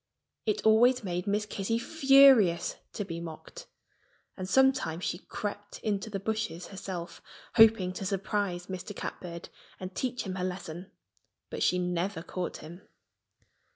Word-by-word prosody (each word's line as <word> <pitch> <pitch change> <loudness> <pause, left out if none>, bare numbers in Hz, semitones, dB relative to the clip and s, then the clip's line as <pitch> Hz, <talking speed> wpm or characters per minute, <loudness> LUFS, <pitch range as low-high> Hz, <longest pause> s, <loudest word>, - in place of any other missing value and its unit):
It 215 - 0
always 240 +3 +5
made 180 -1 -3
Miss 210 +1 +1
Kitty 210 +2 -2
furious 270 - +5 0.2
to 205 - -3
be 170 -2 -5
mocked. 170 - -9 0.7
And 185 -1 -6
sometimes 260 -8 +3
she 175 - -2
crept 205 -1 -6
into 210 0 -1
the 200 -2 -3
bushes 215 -4 -3
herself, 185 -3 -6 0.4
hoping 220 -5 +6
to 195 - -5
surprise 195 -2 -1
Mr. 190 +2 -6
Catbird 170 -4 -6 0.3
and 185 0 -6
teach 250 +3 -2
him 190 -2 -4
a 180 - -2
lesson. 180 -1 -5 0.6
But - - -5
she 180 - +3
never 180 0 -2
caught 180 0 -4
him. 170 +4 -11
195 Hz, 140 wpm, -29 LUFS, 180-220 Hz, 0.7 s, hoping